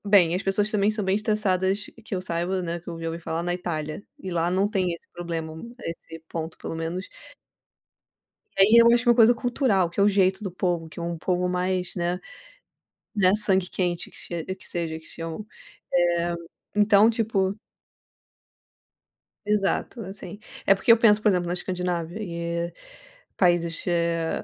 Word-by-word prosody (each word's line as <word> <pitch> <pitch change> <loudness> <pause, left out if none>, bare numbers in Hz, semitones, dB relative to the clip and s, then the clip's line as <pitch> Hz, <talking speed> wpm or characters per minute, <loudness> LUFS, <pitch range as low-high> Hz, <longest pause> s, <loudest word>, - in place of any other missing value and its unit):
"Bem, 180 -5 +5
as 185 - -1
pessoas 205 +2 +1
também 205 0 +2
são 215 -1 -3
bem 190 +1 +2
estressadas" 205 -2 0 0.2
que 215 - -4
eu 185 - -1
saiba, 180 +1 -1
né, 170 0 -3
que 170 - -14
eu 165 -1 -6
já 165 - -4
ouvi 165 +1 -4
falar, 165 0 -3
na 175 0 -1
Itália. 155 -2 -4 0.2
E 190 - -6
lá 170 0 +1
não 195 +3 +2
tem 185 -4 0
esse 170 - -10
problema, 165 -2 -4 0.3
esse 165 0 -7
ponto, 160 0 -5
pelo - - -5
menos 165 +4 -4 1.5
E - - +5
aí 215 +4 +6
eu 235 0 +8
acho 240 +1 +1
uma 240 - +6
coisa 235 0 +7
cultural, 235 - +1
que 175 - -6
é - - +6
o 205 - +6
jeito 195 0 +2
do 190 - -3
povo, 175 -2 -1
que 160 - -10
é - - -3
um 170 0 -3
povo 180 +2 0
mais, 180 0 -1
né 175 +1 -1 1.0
né, 190 -2 +4
sangue 190 -3 +1
quente 175 -2 -2
que - - -17
che 170 -1 -5
que 185 0 -7
seja 165 -2 -3
que 160 - -18
chamam, 165 +5 -6 0.5
eh, 175 -1 +2 0.4
então, 210 +1 +6
tipo 205 -4 0 1.9
Exato, 210 +3 0
assim, 205 +1 -8 0.3
é 195 - +7
porque 195 - +3
eu 230 - +8
penso, 215 -2 +5
por - - +2
exemplo, 180 -3 +1
na 175 - -1
Escandinávia 180 -1 -3
e 170 -2 -3 0.6
países, 175 -2 +2
eh, 170 -1 0
180 Hz, 175 wpm, -25 LUFS, 170-205 Hz, 1.9 s, eu